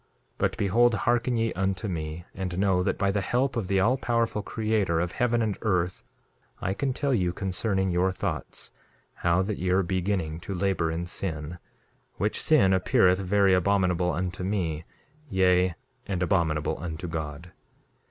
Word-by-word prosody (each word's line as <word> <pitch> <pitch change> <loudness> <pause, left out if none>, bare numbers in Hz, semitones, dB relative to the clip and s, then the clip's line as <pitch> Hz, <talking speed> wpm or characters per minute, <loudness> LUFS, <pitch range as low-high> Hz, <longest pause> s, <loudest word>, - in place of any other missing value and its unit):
2:5 - - -41 0.3
But - - 0
behold, 115 +4 +3
hearken 120 +2 +1
ye 115 0 0
unto 95 +3 -1
me, 80 -2 -4
and 90 -2 -4
know 95 -2 +2
that - - 0
by 100 -1 +1
the 100 0 0
help 125 +7 0
of 115 -6 -2
the 95 0 +2
all 115 +7 +3
powerful 115 -3 0
Creator 105 -6 0
of 90 +1 -1
heaven 120 0 +1
and 105 -3 -2
earth 90 -4 0 0.6
I 95 - -1
can 135 +7 -1
tell 140 +1 0
you 90 -7 +1
concerning 95 +1 -1
your 90 +2 +2
thoughts, 95 - -5 0.5
how 85 +2 +2
that 105 +1 -3
ye 90 - -1
are 95 +2 +3
beginning 90 -3 -1
to 95 +3 -5
labor 90 -3 0
in 85 +2 -2
sin, 85 -2 -4 0.6
which - - -1
sin 95 0 +4
appeareth 90 0 +3
very 95 0 +3
abominable 90 -1 +2
unto 90 +2 -3
me, 90 -6 -1 0.5
yea, 90 -2 +3 0.3
and 90 -2 -1
abominable 80 -7 0
unto 85 +1 -5
God. 80 +1 -5
95 Hz, 165 wpm, -27 LUFS, 85-100 Hz, 0.6 s, sin